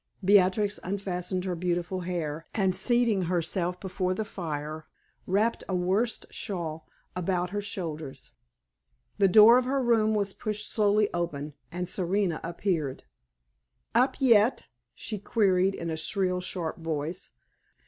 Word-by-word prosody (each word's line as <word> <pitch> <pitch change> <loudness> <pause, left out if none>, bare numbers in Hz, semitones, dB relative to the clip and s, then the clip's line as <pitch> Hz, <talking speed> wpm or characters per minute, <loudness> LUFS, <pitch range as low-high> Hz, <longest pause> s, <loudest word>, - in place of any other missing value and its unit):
Beatrix 200 +1 +4
unfastened 185 -1 -3
her 185 - -1
beautiful 175 +1 -2
hair, 165 -3 -4
and 190 -3 +2
seating 225 -2 +2
herself 175 +1 -1
before 185 -1 -2
the 220 - -2
fire, 155 -5 -5 0.4
wrapped 210 +5 +1
a 190 - 0
worsted 195 +6 0
shawl 165 -5 -4 0.3
about 180 0 -1
her 205 0 -2
shoulders. 160 -8 -5 0.9
The 195 - +6
door 220 +5 +8
of 255 - -3
her 270 +2 0
room 225 -3 +3
was 200 -2 -1
pushed 210 -1 -4
slowly 210 -1 +3
open, 150 -4 -3 0.2
and 180 +1 -3
Serena 185 -1 -1
appeared. 170 -5 -2 0.9
"Up 250 +4 +3
yet?" 235 -3 +4 0.3
she 215 -2 -5
queried 195 -2 +2
in 170 -1 -4
a 160 - -3
shrill, 180 +2 -1
sharp 175 -3 -4
voice. 165 +2 -3
185 Hz, 130 wpm, -28 LUFS, 170-205 Hz, 0.9 s, door